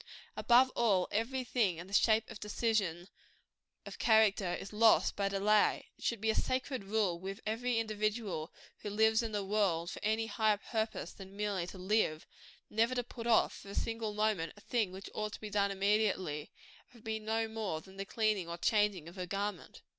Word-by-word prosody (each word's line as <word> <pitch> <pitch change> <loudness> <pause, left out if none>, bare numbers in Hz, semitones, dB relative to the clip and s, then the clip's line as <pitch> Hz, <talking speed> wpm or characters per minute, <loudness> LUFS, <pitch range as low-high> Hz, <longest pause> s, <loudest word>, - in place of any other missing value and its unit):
Above 255 +2 +5
all, 200 -6 +3
every 255 +5 -1
thing 225 -8 +1
in 170 - -7
the 195 - -13
shape 220 +2 +4
of 220 - -9
decision 205 -5 -1 0.8
of - - -9
character 215 -5 +4
is 195 - -8
lost 225 +1 +4
by 200 -1 0
delay. 205 +2 +2
It - - -15
should 235 - 0
be 220 0 +2
a - - -1
sacred 255 -2 -1
rule 195 -4 0
with 195 +3 -6
every 230 +3 0
individual 215 -6 -2 0.3
who 210 - -5
lives 220 +2 +3
in 230 -1 -4
the 205 -2 -2
world 190 -4 +1
for - - -7
any 220 +1 +1
higher 220 -2 +2
purpose 220 +1 -3
than 195 0 -12
merely 200 -4 -1
to 190 - -9
live, 185 -4 0 0.4
never 230 +4 +1
to 245 - 0
put 235 -1 -7
off, 230 - +4
for 200 - -12
a 200 - -7
single 225 -2 -2
moment, 210 -6 0
a - - -14
thing 220 -5 0
which 190 +1 -8
ought 215 -1 -3
to - - -7
be 210 -1 -7
done 200 -1 +2
immediately 195 -6 0 0.4
if - - -23
it 230 - -17
be 220 -1 -2
no 220 +1 -1
more 220 -7 -3
than 190 +4 -15
the 195 - -3
cleaning 210 -4 0
or 170 - -4
changing 205 -3 +1
of 175 +3 -10
a 180 - -3
garment. 200 +3 -4
210 Hz, 200 wpm, -33 LUFS, 195-225 Hz, 0.8 s, Above